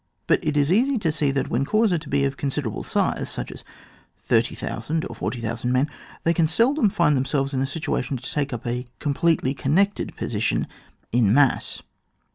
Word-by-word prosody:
But - - +2
it 150 -1 0
is 145 +2 +3
easy 255 +6 +3
to 170 -7 +1
see 150 -2 +1
that, 135 -1 -1
when 125 +4 +1
corps 215 +7 +2
are 145 -4 0
of 135 0 -1
considerable 135 -5 -3
size, - - 0
such - - -4
as - - -10 0.5
30,000 155 +8 -1
or - - -8
40,000 115 0 -3
men, 130 +3 +2 0.4
they 165 - +3
can 165 -1 +3
seldom 230 - +3
find 170 -7 +2
themselves 135 +1 0
in 130 - 0
a 135 - 0
situation 140 -3 -2
to 120 - -6
take 145 -1 -1
up 120 -2 -5
a 125 +1 -3
completely 145 -2 +1
connected 175 +10 0
position 110 -1 0 0.5
in 115 -4 +3
mass. 135 +2 +2
140 Hz, 175 wpm, -24 LUFS, 130-165 Hz, 0.5 s, is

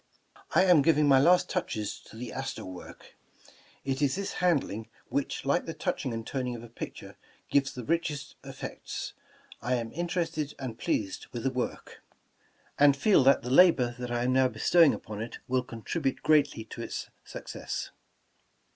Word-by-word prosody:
"I - - +7
am 180 -5 +6
giving 150 0 +4
my 135 -2 +7
last 175 +6 +5
touches 110 - -3
to - - -14
the 120 +2 -6
Astor 135 0 -4
work. 90 -1 -11 0.7
It 135 +1 -1
is 140 0 +2
this 200 +1 -3
handling, 130 - +1 0.2
which, 140 - -2
like 140 +6 +1
the 165 - -4
touching 130 - -2
and 115 -1 -4
toning 125 -2 -2
of 115 - -8
a 120 - -11
picture, 115 - -8 0.3
gives 140 -1 +3
the 125 - -7
richest 155 -1 -1
ef - - -10
fects. - - -5 0.5
I 125 +2 +1
am 115 -2 -3
interested 165 -3 -2
and 125 -4 -6
pleased 95 -3 -2
with 120 -2 -5
the 135 - +1
work, 125 -1 -4 0.8
and 140 -1 +6
feel 195 -2 +5
that 135 - +5
the 125 - -4
labor 135 -6 +6
that 125 -1 -4
I 120 0 0
am 125 +1 +2
now 130 0 +5
bestowing 165 +4 +4
upon 105 -1 -7
it 115 - -6
will 130 0 +2
contribute 130 +5 -3
greatly 145 -7 +3
to 110 - -9
its - - -5
success." - - -6
135 Hz, 175 wpm, -29 LUFS, 120-155 Hz, 0.8 s, I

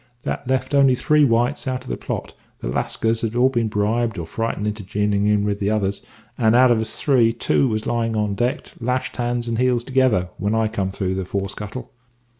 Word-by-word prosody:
That 135 - -4
left 130 +1 -1
only 135 -2 +5
three 150 +4 +3
whites 120 +2 +1
out 130 -1 -2
of - - -11
the - - -1
plot - - -5 0.2
the - - -6
Lascars 115 - -1
had 115 0 -2
all 125 +2 +4
been 120 -4 0
bribed 110 +2 0
or 85 - -4
frightened 115 +3 -3
into 105 0 -3
jining 105 +1 0
in 105 -1 +3
with 100 -1 -1
t'others 100 -1 0 0.4
and, 110 -1 +4
out 125 0 +6
of 115 -2 +3
us 110 0 -5
three, 125 -5 +3
two 120 +3 +1
was 110 -2 -2
lying 115 -1 0
on 105 -1 0
deck, 120 +5 -2
lashed 125 +1 -2
hands 120 -1 -1
and 115 0 -1
heels 125 -1 +2
together 130 -9 +2
when 100 +3 0
I 110 -1 +1
come 100 -3 -2
up 95 - -7
through 95 -2 -1
the 95 -1 -3
fore 100 +1 -3
scuttle. 105 +5 -7
115 Hz, 220 wpm, -21 LUFS, 105-125 Hz, 0.4 s, out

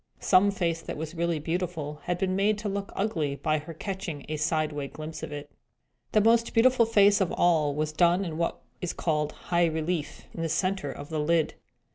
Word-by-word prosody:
Some 190 +1 +5
face 170 -4 -1
that - - -6
was 160 +1 -5
really 170 -1 0
beautiful 160 -2 -3
had 175 - 0
been 185 0 0
made 205 +2 +2
to 210 0 -4
look 200 0 -3
ugly 165 -9 -1
by 155 +1 0
her 155 +3 -9
catching 190 -6 -5
a 155 - -3
sideway 150 -2 -1
glimpse 155 +3 -8
at - - -6
it. 145 0 -7 0.6
The 215 - +4
most 230 +2 +3
beautiful 235 0 +5
face 205 -2 +5
of 185 - +1
all 155 -5 +3
was 155 0 -1
done 175 +4 +3
in 160 -2 -5
what 170 - -1 0.2
is 180 - -2
called 150 -2 0
high 175 -1 +1
relief, 160 0 -2
in 165 - -5
the 165 - -1
centre 185 -4 0
of 145 - -9
the 160 -1 -2
lid. 160 +1 +2
170 Hz, 200 wpm, -27 LUFS, 155-195 Hz, 0.6 s, Some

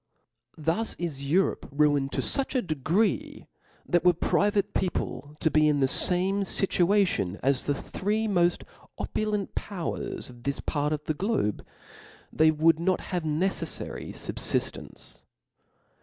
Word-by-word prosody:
Thus 165 +9 -1
^^j^^'^'^^ 175 - -3
is 145 -5 -5
Europe 185 +5 +1
ruined 145 -1 +2
to - - 0
fuch 275 0 0
a 255 - +2
degree, 165 - 0 0.4
that 175 -2 +2
were 180 0 +6
private 205 +4 +1
people 150 -5 -2
to 160 - +2
be 155 0 +4
in 150 -1 +2
the 135 - +3
fame 185 +7 +2
Tituation 185 - +1
as 135 0 +1
the 145 - +2
three 210 +8 -2
moft 175 -3 +2 0.3
opulent 210 -2 -2
powers 185 -5 -4
of 120 -1 -13
this 140 +2 -2
part 150 0 -1
of 150 -1 -2
the 155 - -1
globe, 185 - -1 0.7
they 155 0 +5
would 155 +1 +3
not 185 +2 +1
have 180 - +1
neceflary 160 +5 -2
fubfiflrence. - - -3
170 Hz, 140 wpm, -27 LUFS, 150-195 Hz, 0.7 s, were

